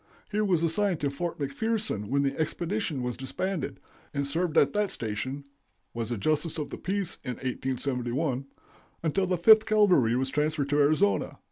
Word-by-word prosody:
He 210 Hz, +1 st, +1 dB
was 180 Hz, -6 st, +2 dB
assigned 175 Hz, +1 st, +1 dB
to 140 Hz, -1 st, 0 dB
Fort 170 Hz, +5 st, -3 dB
McPherson 150 Hz, -, -1 dB
when 140 Hz, +4 st, +1 dB
the 135 Hz, 0 st, 0 dB
expedition 165 Hz, -2 st, -1 dB
was 125 Hz, -1 st, -2 dB
disbanded, 165 Hz, +5 st, -3 dB, 0.4 s
and 140 Hz, 0 st, 0 dB
served 160 Hz, +3 st, 0 dB
at 140 Hz, -, +5 dB
that 210 Hz, -1 st, +1 dB
station 130 Hz, +6 st, -3 dB, 0.5 s
(was 115 Hz, -1 st, -3 dB
a 120 Hz, -, -2 dB
justice 155 Hz, -, 0 dB
of 145 Hz, -2 st, -4 dB
the -, -, -6 dB
peace 195 Hz, -2 st, -2 dB
in 125 Hz, -3 st, -3 dB
1871) 130 Hz, +1 st, -2 dB, 0.6 s
until 185 Hz, +4 st, +1 dB
the 180 Hz, 0 st, +1 dB
Fifth 220 Hz, +5 st, +7 dB
Cavalry 185 Hz, -, +4 dB
was 130 Hz, +1 st, 0 dB
transferred 150 Hz, -1 st, 0 dB
to 145 Hz, +1 st, +2 dB
Arizona. 155 Hz, +8 st, +2 dB
150 Hz, 165 wpm, -28 LUFS, 135-185 Hz, 0.6 s, Fifth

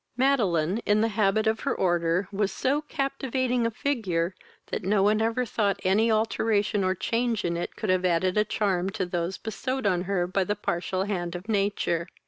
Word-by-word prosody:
Madeline, 205 Hz, -, +2 dB
in 210 Hz, -2 st, +2 dB
the 225 Hz, -, +2 dB
habit 210 Hz, 0 st, +1 dB
of 220 Hz, 0 st, +1 dB
her -, -, -1 dB
order, 175 Hz, 0 st, +1 dB
was 200 Hz, -1 st, 0 dB
so 280 Hz, +3 st, 0 dB
captivating 260 Hz, -4 st, -1 dB
a -, -, 0 dB
figure, 215 Hz, -, -1 dB, 0.4 s
that -, -, -2 dB
no 195 Hz, +1 st, +2 dB
one 210 Hz, +2 st, +3 dB
ever 230 Hz, +3 st, +1 dB
thought 205 Hz, -3 st, 0 dB
any 210 Hz, +5 st, +3 dB
alteration 215 Hz, -1 st, +1 dB
or 185 Hz, 0 st, +1 dB
change 230 Hz, +2 st, -1 dB
in 170 Hz, 0 st, 0 dB
it 170 Hz, -, -4 dB
could 215 Hz, -4 st, -1 dB
have 185 Hz, 0 st, +1 dB
added 180 Hz, +1 st, +2 dB
a 210 Hz, -, +4 dB
charm 195 Hz, -4 st, 0 dB
to 190 Hz, -1 st, -2 dB
those 175 Hz, +1 st, -2 dB
bestowed 255 Hz, +3 st, -4 dB
on 180 Hz, -2 st, +1 dB
her 180 Hz, -2 st, 0 dB
by 190 Hz, +2 st, 0 dB
the 205 Hz, +3 st, -1 dB
partial 185 Hz, -1 st, -2 dB
hand 180 Hz, -4 st, -3 dB
of 180 Hz, +4 st, -7 dB
nature. 200 Hz, -5 st, 0 dB
205 Hz, 190 wpm, -26 LUFS, 185-225 Hz, 0.4 s, a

